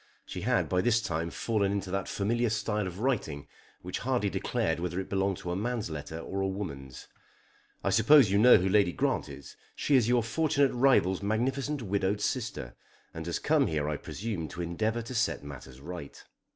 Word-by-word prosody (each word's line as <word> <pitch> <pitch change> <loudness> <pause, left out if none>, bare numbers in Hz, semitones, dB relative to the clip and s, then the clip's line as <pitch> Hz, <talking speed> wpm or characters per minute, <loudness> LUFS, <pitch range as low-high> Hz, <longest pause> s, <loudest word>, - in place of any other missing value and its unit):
She - - -6
had - - +1
by 90 0 +1
this 120 0 +3
time 85 -5 -2
fallen 100 0 0
into 100 -2 -3
that 95 -1 -2
familiar 115 +4 0
style 105 -2 -1
of 90 0 -7
writing 100 - -1 0.4
which 90 0 -4
hardly 125 -6 0
declared 80 0 -1
whether 90 +1 -2
it 95 - -6
belonged 95 -1 +1
to 85 - -5
a - - -1
man's 110 -2 -2
letter 75 +1 -6
or 95 +3 -4
a 95 - +1
woman's. 75 -10 -6 0.8
"I 100 - +1
suppose 110 +2 +6
you 100 - +3
know 125 +2 +8
who 95 0 0
Lady 95 -2 +3
Grant - - 0
is. - - -10 0.2
She 145 - +2
is 120 -3 +4
your 120 -1 +3
fortunate 140 +2 +1
rival's 120 -8 +3
magnificent 130 +6 -1
widowed 100 0 0
sister, 105 - -3 0.4
and 80 +1 -6
has 85 - -1
come 150 -3 +2
here 75 -2 -1
I 75 - -1
presume 95 +1 -4
to 85 - -7
endeavour 110 +7 -1
to 120 - -7
set 85 - 0
matters 65 -2 -10
right. 85 -1 -8
100 Hz, 190 wpm, -29 LUFS, 85-120 Hz, 0.8 s, know